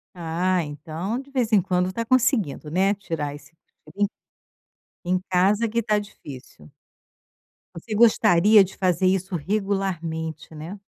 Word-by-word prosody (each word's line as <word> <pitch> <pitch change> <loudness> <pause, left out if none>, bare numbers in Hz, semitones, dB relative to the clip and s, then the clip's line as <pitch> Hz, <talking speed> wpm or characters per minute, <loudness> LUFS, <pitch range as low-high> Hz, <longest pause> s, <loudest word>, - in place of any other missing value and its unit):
Ah, 175 +2 0
então 155 +8 -5
de 275 +1 -12
vez 245 -4 0
em 210 - +6
quando 180 +1 0
está 230 +5 -3
conseguindo, 230 - +1
né, 190 +5 +2
tirar 165 -7 -4
esse 145 0 -13 0.3
cochilo. 200 +7 -1 1.0
Em, 180 - -1
em 180 - -2
casa 200 +5 +2
que 230 - -2
está 210 -2 +1
difícil. 130 - -11 1.1
Você 210 +6 -6
gostaria 215 -2 +5
de 190 0 -9
fazer 185 0 +1
isso 190 0 0
regularmente, 170 -4 -3
né. 160 +6 -8
185 Hz, 135 wpm, -24 LUFS, 160-210 Hz, 1.1 s, em